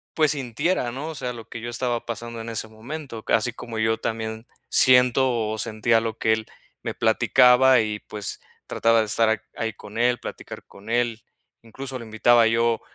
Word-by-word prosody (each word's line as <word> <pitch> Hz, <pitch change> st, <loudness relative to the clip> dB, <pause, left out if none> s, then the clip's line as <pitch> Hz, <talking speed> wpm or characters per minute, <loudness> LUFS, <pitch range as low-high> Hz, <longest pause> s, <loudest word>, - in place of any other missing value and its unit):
pues, 155 Hz, -2 st, +3 dB
sintiera, 135 Hz, +1 st, -1 dB
¿no? 140 Hz, +6 st, -5 dB
O 160 Hz, -, -7 dB
sea, 125 Hz, -3 st, -4 dB
lo 115 Hz, -2 st, -11 dB
que 115 Hz, -, -7 dB
yo 120 Hz, -, -5 dB
estaba 120 Hz, 0 st, -2 dB
pasando 115 Hz, 0 st, -6 dB
en 115 Hz, -, -7 dB
ese 110 Hz, -1 st, -3 dB
momento, 115 Hz, +2 st, -8 dB
así 125 Hz, -, +2 dB
como 115 Hz, -1 st, -8 dB
yo 110 Hz, 0 st, +1 dB
también 110 Hz, +1 st, -4 dB, 0.2 s
siento, 125 Hz, -3 st, +4 dB
o 110 Hz, -, -3 dB
sentía 115 Hz, +1 st, +1 dB
lo 110 Hz, -1 st, -4 dB
que 110 Hz, -, +3 dB
él 110 Hz, 0 st, -3 dB, 0.4 s
me -, -, -4 dB
platicaba, 125 Hz, 0 st, +5 dB
y 105 Hz, -1 st, -3 dB
pues, 105 Hz, -2 st, -6 dB, 0.3 s
trataba 115 Hz, 0 st, +2 dB
de -, -, -1 dB
estar 110 Hz, 0 st, +2 dB
ahí 110 Hz, -2 st, -3 dB
con 105 Hz, +3 st, -11 dB
él, 120 Hz, 0 st, +2 dB
platicar -, -, -9 dB
con 100 Hz, +3 st, -14 dB
él. 120 Hz, -1 st, 0 dB, 0.4 s
Incluso, 130 Hz, +3 st, -7 dB
lo 115 Hz, -, -9 dB
invitaba 115 Hz, +1 st, +4 dB
yo 115 Hz, 0 st, +1 dB
115 Hz, 185 wpm, -24 LUFS, 110-125 Hz, 0.4 s, platicaba